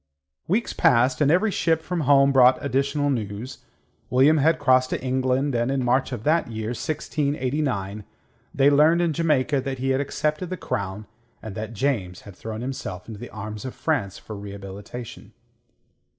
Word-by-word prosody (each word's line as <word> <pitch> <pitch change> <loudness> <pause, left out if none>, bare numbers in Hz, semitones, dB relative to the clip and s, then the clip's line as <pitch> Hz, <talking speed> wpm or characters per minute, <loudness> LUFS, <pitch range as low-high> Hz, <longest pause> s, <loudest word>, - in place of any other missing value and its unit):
Weeks 215 +7 0
passed, 125 +4 +3
and 145 - +4
every 185 +7 +3
ship 165 -4 +1
from 175 +2 -4
home 140 -1 +5
brought 130 -1 +6
additional 140 +1 0
news. 110 0 -4 0.5
William 135 +5 +5
had 155 +3 +3
crossed 130 0 +3
to - - -2
England, 130 +2 0
and 120 +1 0
in 135 -2 0
March 130 +2 +1
of 120 -4 -5
that 160 +4 +2
year 110 -1 -4
1689 130 -6 -2 0.5
they 140 +1 +4
learnt 155 +4 +5
in 170 -2 +1
Jamaica 150 -4 +1
that 135 0 -4
he 130 +1 -2
had 130 +1 +1
accepted 155 +4 -2
the 185 - -4
crown 100 - -4 0.3
and 110 -2 -8
that 110 +1 -6
James 105 -8 -1
had 100 -3 -12
thrown 110 +2 -6
himself 120 -8 -5
into 110 -3 -8
the 120 - -8
arms 105 0 -7
of 130 - -6
France 100 - -1
for 110 - -9
rehabilitation. 100 +3 -9
130 Hz, 165 wpm, -24 LUFS, 110-145 Hz, 0.5 s, brought